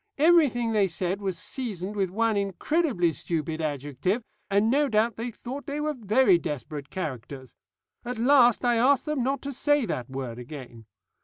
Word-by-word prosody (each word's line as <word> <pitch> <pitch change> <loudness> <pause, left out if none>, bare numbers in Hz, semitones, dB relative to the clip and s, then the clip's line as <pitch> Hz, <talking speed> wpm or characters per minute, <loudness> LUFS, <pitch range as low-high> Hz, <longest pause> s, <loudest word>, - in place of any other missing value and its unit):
Everything 285 -7 +4
they 210 -3 +3
said 185 +2 -2
was 190 -3 -2
seasoned 210 -2 -4
with 195 -3 0
one 225 +3 +1
incredibly 200 - +1
stupid 160 0 -3
adjective, 145 - -2 0.3
and 200 +2 +3
no 285 +1 +2
doubt 220 0 +2
they 230 +3 -4
thought 255 +4 -8
they 290 +1 -3
were 305 0 -1
very 220 -5 +3
desperate 145 -1 -5
characters. 130 -6 -6 0.5
At 245 0 -4
last 245 -1 +5
I 240 -1 +3
asked 260 +3 +3
them 300 -3 -1
not 270 +2 -1
to 280 0 -4
say 290 0 +2
that 125 - -4
word 130 -3 -5
again. 120 -4 -10
210 Hz, 165 wpm, -26 LUFS, 160-255 Hz, 0.5 s, last